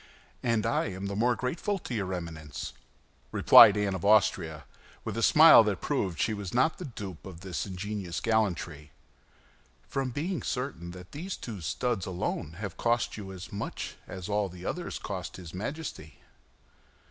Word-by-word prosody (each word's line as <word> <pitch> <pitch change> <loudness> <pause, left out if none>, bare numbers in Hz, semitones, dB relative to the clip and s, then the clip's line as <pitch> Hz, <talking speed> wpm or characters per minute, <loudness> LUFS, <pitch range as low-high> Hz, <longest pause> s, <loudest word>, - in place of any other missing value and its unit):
"And 115 -2 +1
I 115 - +1
am 95 -1 -5
the 100 0 -3
more 120 +4 +2
grateful 175 +10 -2
to 150 - -7
your 100 -5 -2
Eminence," 80 -4 -6 0.6
replied 105 - +9
Anne 100 -2 0
of 95 - -4
Austria, 90 -7 +3 0.4
with - - -3
a - - -1
smile - - +9
that - - 0
proved 85 -6 -1
she 110 - +1
was 100 -1 -5
not 145 +6 +2
the 180 - -5
dupe 100 - -7
of 90 -3 -10
this 95 0 -4
ingenious 95 -2 -4
gallantry, 85 - -1 0.9
"from 135 -1 -2
being 160 +8 -2
certain 125 - -3
that 90 0 -10
these 180 +7 -5
two 105 -6 -7
studs 110 +4 -1
alone 90 -4 -3
have 100 +2 -6
cost 120 0 +1
you 100 -3 -7
as 90 -2 -9
much 100 - -4
as 90 0 -7
all 105 -1 0
the 90 +1 -10
others 175 -1 -3
cost 95 -3 -5
his 90 -3 -10
Majesty." 95 - -6
100 Hz, 165 wpm, -29 LUFS, 90-115 Hz, 0.9 s, replied